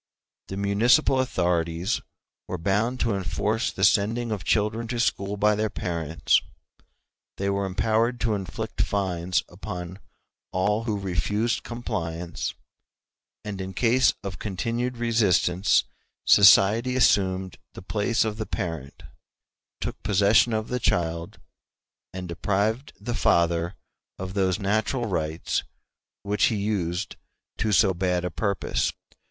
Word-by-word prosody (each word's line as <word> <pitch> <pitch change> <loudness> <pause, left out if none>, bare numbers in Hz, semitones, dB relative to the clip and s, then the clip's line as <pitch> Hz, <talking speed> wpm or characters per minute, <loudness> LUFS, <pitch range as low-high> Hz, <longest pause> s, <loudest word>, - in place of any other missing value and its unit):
The 95 - -6
municipal 115 +8 +3
authorities 90 -4 0 0.5
were 90 - -3
bound 105 +8 0
to 115 - +1
enforce 100 +4 -1
the 95 - -4
sending 110 +4 +3
of 100 -5 -3
children 110 +4 0
to 120 +1 -3
school 100 -3 0
by 105 +1 +3
their 110 +1 0
parents; 85 -4 0 1.0
they 100 0 0
were 100 0 -1
empowered 110 +5 +1
to 115 -3 +1
inflict 95 -6 -4
fines 90 -3 0
upon 90 -1 -7 0.5
all 105 +4 0
who 110 -3 -1
refused 100 +5 -1
compliance; 90 -8 -4 0.9
and 100 -2 -4
in 95 0 -6
case 125 +4 +3
of 100 -3 -6
continued 115 +5 -2
resistance 105 -6 +2 0.4
society 105 +5 +6
assumed 95 -6 +2
the - - -10
place 110 +4 0
of 110 -1 -3
the 110 - -4
parent, 80 -9 -5 0.8
took - - -5
possession 105 +4 +4
of 110 0 -2
the 125 - -1
child, 85 -5 -1 0.7
and 95 -1 -6
deprived 105 - -1
the 120 +4 -4
father 85 -5 +2 0.4
of 95 0 -6
those 95 -2 +1
natural 110 +5 0
rights 80 -5 -1 0.6
which 105 0 +2
he 115 - +1
used 100 -5 -2 0.4
to 110 0 0
so 95 -1 +4
bad 90 0 0
a 90 - -2
purpose. 100 +2 -1
100 Hz, 125 wpm, -25 LUFS, 90-110 Hz, 1.0 s, society